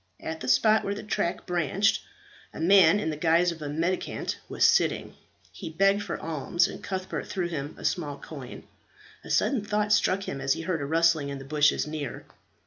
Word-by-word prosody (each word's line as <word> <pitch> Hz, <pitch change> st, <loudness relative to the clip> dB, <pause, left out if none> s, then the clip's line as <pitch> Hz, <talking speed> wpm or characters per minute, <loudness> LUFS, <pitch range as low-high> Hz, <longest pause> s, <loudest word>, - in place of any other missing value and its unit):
At 160 Hz, 0 st, -5 dB
the 130 Hz, -, -6 dB
spot 135 Hz, +13 st, +4 dB
where 200 Hz, -, -2 dB
the 210 Hz, -, -7 dB
track 175 Hz, -4 st, -2 dB
branched, 180 Hz, +4 st, +1 dB, 0.5 s
a -, -, -7 dB
man 180 Hz, +1 st, +6 dB
in 160 Hz, -, -2 dB
the -, -, -4 dB
guise 170 Hz, +3 st, +3 dB
of 165 Hz, -2 st, -9 dB
a 145 Hz, -, -4 dB
mendicant 165 Hz, +5 st, -2 dB
was -, -, +2 dB
sitting. 465 Hz, +1 st, +1 dB, 0.4 s
He -, -, -8 dB
begged 195 Hz, +5 st, +2 dB
for 205 Hz, -, -5 dB
alms, 165 Hz, +3 st, 0 dB
and -, -, -9 dB
Cuthbert 190 Hz, -1 st, -4 dB
threw 185 Hz, -3 st, -2 dB
him 150 Hz, -3 st, -5 dB
a -, -, -9 dB
small 145 Hz, -5 st, -1 dB
coin. 140 Hz, -3 st, -9 dB, 0.6 s
A -, -, -11 dB
sudden 250 Hz, -7 st, +1 dB
thought 210 Hz, 0 st, 0 dB
struck 195 Hz, -1 st, +2 dB
him 135 Hz, -7 st, -5 dB
as 135 Hz, 0 st, +2 dB
he -, -, -5 dB
heard 165 Hz, -2 st, -2 dB
a -, -, -2 dB
rustling 160 Hz, -2 st, +2 dB
in 140 Hz, -, -5 dB
the 135 Hz, -, -10 dB
bushes 150 Hz, +1 st, +2 dB
near. 150 Hz, -4 st, -6 dB
165 Hz, 200 wpm, -27 LUFS, 150-195 Hz, 0.6 s, man